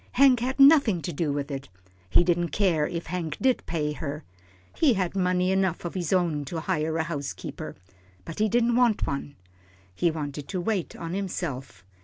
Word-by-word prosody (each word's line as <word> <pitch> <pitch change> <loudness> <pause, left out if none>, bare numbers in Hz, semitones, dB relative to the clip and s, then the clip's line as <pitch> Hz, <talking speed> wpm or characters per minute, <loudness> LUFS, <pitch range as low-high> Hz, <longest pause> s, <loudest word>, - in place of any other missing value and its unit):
Hank 260 -2 +6
had 260 +3 -2
nothing 275 - +6
to 175 - -3
do 150 0 -1
with 145 0 -3
it. 135 -4 -6 0.4
He 135 - +5
didn't 175 -1 +1
care 170 -7 +1
if 170 -1 -4
Hank 165 -3 -4
did 260 -1 +2
pay 150 -3 -1
her. 150 +1 -5 0.5
He 280 -8 +4
had 185 -1 -1
money 180 -1 +1
enough 190 -3 0
of 175 - -4
his 175 -4 -3
own 170 -6 +1
to 160 +3 -4
hire 160 -2 -1
a 160 - +1
housekeeper. 150 -4 -5 0.5
But 165 - -7
he 215 0 +3
didn't 235 +1 +2
want 240 -4 +3
one. 140 +1 -4 0.6
He 170 - +1
wanted 145 -3 -5
to 185 - -3
wait 190 -1 -2
on 165 0 -6
himself. 145 - -4
175 Hz, 185 wpm, -26 LUFS, 150-195 Hz, 0.6 s, Hank